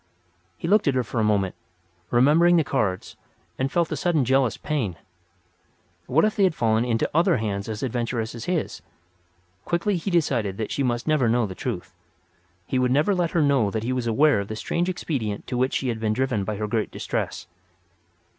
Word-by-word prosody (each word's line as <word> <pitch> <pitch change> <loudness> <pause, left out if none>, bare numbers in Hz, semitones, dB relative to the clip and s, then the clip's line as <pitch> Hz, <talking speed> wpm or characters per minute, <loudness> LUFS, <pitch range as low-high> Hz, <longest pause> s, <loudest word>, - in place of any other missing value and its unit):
He - - -4
looked 210 0 +3
at 140 - +2
her 125 - +2
for 120 - -4
a - - +2
moment, 100 -3 +1 0.6
remembering 155 +8 +5
the 165 - +4
cards, 100 -10 -2 0.4
and 135 +1 0
felt 170 -2 +1
a - - 0
sudden 160 -7 +1
jealous 130 -1 +2
pain. 130 - -2 1.1
What 155 +10 +3
if 215 - 0
they 200 - +2
had 185 -4 +3
fallen 110 -2 +2
into 115 -2 0
other 170 +1 +3
hands 100 -2 -3
as 110 +1 -4
adventurous 120 -2 -2
as 115 0 -7
his? 175 -4 -2 0.8
Quickly 175 +3 0
he 175 - -3
decided 125 - 0
that 110 - -3
she - - -1
must 120 -1 -1
never 150 -7 +3
know 120 0 +2
the 95 - -6
truth. 100 -2 -5 0.7
He 130 - -1
would 125 0 +2
never 150 +9 +3
let 175 -3 0
her 165 -3 +1
know 135 -7 +3
that 110 +2 -3
he 125 +2 -1
was 125 -2 -2
aware 135 +1 +4
of 100 - -4
the 110 - -5
strange 175 +10 -1
expedient 130 - -3
to - - -4
which 130 +2 +1
she 130 - -1
had 115 -2 -2
been 110 -1 0
driven 125 -4 -1
by 105 - -2
her 105 +1 -3
great 110 0 -1
distress. - - -4
125 Hz, 200 wpm, -24 LUFS, 110-155 Hz, 1.1 s, remembering